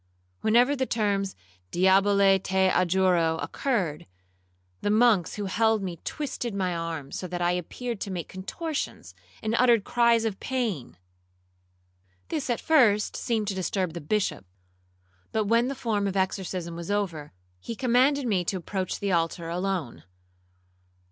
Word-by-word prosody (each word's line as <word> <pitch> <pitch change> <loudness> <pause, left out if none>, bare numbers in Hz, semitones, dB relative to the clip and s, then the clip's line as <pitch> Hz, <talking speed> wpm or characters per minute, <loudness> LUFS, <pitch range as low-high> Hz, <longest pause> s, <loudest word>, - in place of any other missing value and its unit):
Whenever 245 +6 +4
the 260 -1 -1
terms 200 -3 0 0.3
'diabole 195 - +4
te 190 0 +2
adjuro' 180 -3 +2
occurred, 185 - -2 0.7
the - - 0
monks 215 -5 +3
who 205 - -3
held 220 +2 +2
me 175 -4 -5
twisted 245 -7 -4
my 185 -3 -1
arms, 165 -4 -4
so 185 - -5
that 175 0 -4
I 175 0 +2
appeared 205 +6 -4
to - - -3
make 180 -3 -4
contortions, 300 - -5 0.3
and 220 0 -1
uttered 240 -4 +5
cries 235 -1 +3
of 210 -3 -2
pain. 205 - -3 1.3
This, 295 -5 -2
at 240 - 0
first, 230 -10 +3
seemed 225 -4 -1
to - - -1
disturb 185 -1 -2
the 170 - -6
Bishop; 200 - -1 0.9
but 220 - +1
when 230 +3 +3
the 275 - -3
form 215 -6 -1
of 195 0 -2
exorcism 185 -2 -2
was 170 +1 -7
over, 175 -8 -2 0.3
he 230 - -6
commanded 260 +3 +3
me 200 -6 +1
to 190 - -1
approach 185 +1 -4
the 200 -1 0
altar 165 0 0
alone. 180 -6 -3
195 Hz, 145 wpm, -27 LUFS, 180-230 Hz, 1.3 s, uttered